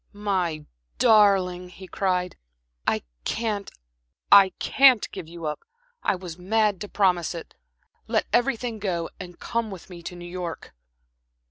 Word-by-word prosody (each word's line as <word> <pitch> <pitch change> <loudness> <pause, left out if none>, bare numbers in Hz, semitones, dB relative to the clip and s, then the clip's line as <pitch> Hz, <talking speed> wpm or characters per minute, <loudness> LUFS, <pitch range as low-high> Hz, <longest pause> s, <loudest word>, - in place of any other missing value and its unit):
"My 185 -7 -1 0.3
darling," 190 -4 +4
he 190 +1 -11
cried 180 -2 -1 0.5
"I - - +1 0.2
can't 215 - -2 0.6
I 200 -1 +9
can't 265 -5 +5
give 185 -5 -7
you 170 0 -8
up. 150 0 -2 0.4
I - - +1
was 180 -2 -8
mad 210 +1 +1
to 205 - -5
promise 180 -4 +1
it. 165 - -8 0.5
Let - - +1
everything 240 -2 +1
go 175 -5 -2
and 180 -1 -9
come 230 -2 -2
with 190 -1 -10
me 175 -1 -9
to 175 - -7
New 175 0 -9
York." 175 -1 -6
185 Hz, 140 wpm, -25 LUFS, 175-210 Hz, 0.6 s, I